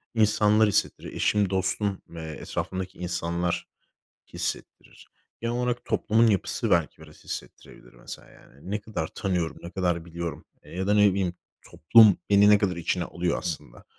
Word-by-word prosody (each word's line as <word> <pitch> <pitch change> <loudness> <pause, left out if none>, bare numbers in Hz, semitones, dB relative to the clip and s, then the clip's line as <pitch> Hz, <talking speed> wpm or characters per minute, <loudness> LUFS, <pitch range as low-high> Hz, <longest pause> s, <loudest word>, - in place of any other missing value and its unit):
insanlar 105 0 +4
hissettiriyor. 100 - -1
Eşim, 105 -3 +1
dostum 95 +1 -1
ve 85 -1 -8
etrafımdaki 95 +4 -5
insanlar 85 0 -2 0.7
hissettirir. - - -6 0.3
Genel 115 +1 -2
olarak 125 0 -1
toplumun 115 +2 +2
yapısı 100 -4 0
belki - - +1
biraz - - -16
hissettirebilir 60 - -9
mesela, - - -11
yani. 70 +8 -15
Ne 105 0 -1
kadar 105 -7 -4
tanıyorum, 90 -4 -2
ne 85 - -8
kadar 90 -3 -1
biliyorum, 85 -1 -6 0.2
eee, - - -15
ya 95 +1 -2
da 105 - +3
ne 105 -1 +6
bileyim, 95 -2 -1 0.4
toplum 105 +4 +6
beni 100 +1 +6
ne 105 - +7
kadar 95 -4 0
içine 85 +1 -1
alıyor 85 0 -2
aslında. 80 -8 -6
95 Hz, 150 wpm, -26 LUFS, 85-105 Hz, 0.7 s, ne